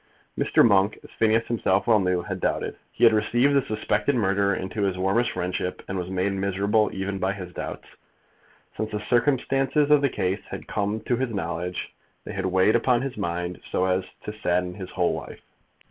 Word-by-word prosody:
Mr. - - +4
Monk, 100 0 +3
as - - -14
Phineas 115 +1 +2
himself 100 -4 +1
well 110 -3 +5
knew, 90 -2 0
had - - -4
doubted. - - -1 0.2
He - - -3
had 115 -2 +8
received 120 +6 +2
the 140 - +4
suspected 110 +4 0
murderer 100 -3 +2
into 95 +3 -4
his 95 -2 0
warmest 95 +6 +1
friendship, 90 0 -3
and 95 - -4
was 90 -1 -3
made 95 +1 0
miserable 100 +2 +1
even 95 0 -3
by 95 +1 0
his 90 -3 -8
doubts. - - -6 0.9
Since 110 - -3
the 105 - -1
circumstances 135 +4 +1
of 150 -1 +6
the 140 - +2
case 95 -3 -1
had - - -7
come 105 +1 -2
to 120 - 0
his 130 0 -1
knowledge, 90 -3 -4 0.3
they - - -7
had 95 -1 -2
weighed 95 +4 +3
upon 120 +1 +2
his 135 -1 -4
mind 90 -1 -3
so 90 - +1
as 95 0 +1 0.2
to 105 - -5
sadden 90 -3 -1
his 95 -1 -8
whole 90 -2 +1
life. - - -7
100 Hz, 190 wpm, -25 LUFS, 95-115 Hz, 0.9 s, had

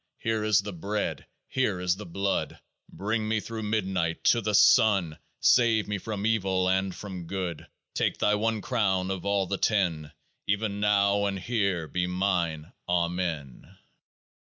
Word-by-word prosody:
Here 110 -1 -1
is 105 -2 +3
the 105 0 -6
Bread; 100 +5 -3 0.2
here 105 -8 0
is 90 0 +1
the 105 0 -9
Blood. 100 +3 -2 0.3
Bring 110 +2 -2
me 110 0 +1
through 110 +1 -6
midnight 95 -6 -1
to 120 - +4
the 105 -1 0
Sun! 95 -7 +4 0.2
Save 115 -3 +4
me 105 -1 -2
from 105 0 -4
Evil 95 -4 +1
and 95 0 0
from 90 -3 -7
Good! 90 -4 -4 0.3
That - - 0
Thy 105 - +2
one 110 +1 0
crown 95 -7 0
of 95 0 -4
all 100 -1 +1
the 100 +1 -3
Ten. 85 -8 0 0.4
Even 105 0 -1
now 100 -1 +3
and 100 -1 -2
here 100 -6 -1
be 90 +4 -1
mine. 90 -4 -1 0.2
AMEN. 85 -6 -2
100 Hz, 155 wpm, -27 LUFS, 90-105 Hz, 0.4 s, to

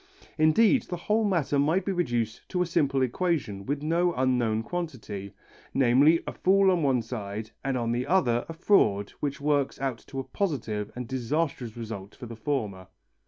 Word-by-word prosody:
Indeed 220 - +4
the 175 - -3
whole 215 +6 +1
matter 170 -8 +1
might 160 +7 +2
be 195 - 0
reduced 120 - -2
to 180 -1 +1
a - - -2
simple 140 -6 +1
equation 130 - -1
with 145 +1 -2
no 170 +2 +1
unknown 120 -4 +1
quantity, 110 - -5 0.4
namely 135 +5 +5
a - - -5
fool 195 +1 +4
on 180 -2 +1
one 130 -5 +2
side 110 -2 -5
and 135 -1 0
on 115 -1 -1
the 125 +2 -1
other 125 -9 +2
a - - -4
fraud 110 - +2
which 140 -1 -2
works 145 -1 0
out 135 -4 -2
to 135 - -8
a - - -2
positive 115 - -2
and 125 -1 -5
disastrous 130 -2 -2
result 110 -4 -7
for - - -9
the 115 0 -8
former. 105 -7 -3
135 Hz, 175 wpm, -27 LUFS, 115-165 Hz, 0.4 s, namely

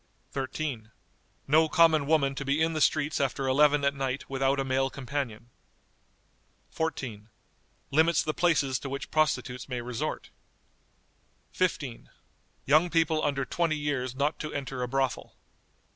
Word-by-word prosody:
"13. 135 -4 -4 0.6
No 155 +3 +4
common 160 -4 +4
woman 145 -3 +3
to 140 - -5
be 140 +2 0
in 160 +1 +2
the 155 - -2
streets 155 0 +2
after 135 0 -1
eleven 145 +1 +4
at 140 - +2
night 135 -1 -3
without 135 0 0
a - - +1
male 135 0 +1
companion." 125 -4 -5 1.2
14. 120 -10 -4 0.6
Limits 160 +3 +3
the 155 - -2
places 150 -7 +2
to 135 - -6
which 135 +1 -5
prostitutes 150 -5 0
may 125 -1 -3
resort. 120 -1 -4 1.2
"15. 145 -9 -2 0.6
Young 155 +6 +4
people, 160 -2 +2
under 135 -2 0
twenty 165 0 0
years, 135 -4 -2
not 145 +3 0
to 155 - -5
enter 135 -2 -4
a 125 - -1
brothel." 135 0 -2
140 Hz, 140 wpm, -28 LUFS, 130-155 Hz, 1.2 s, No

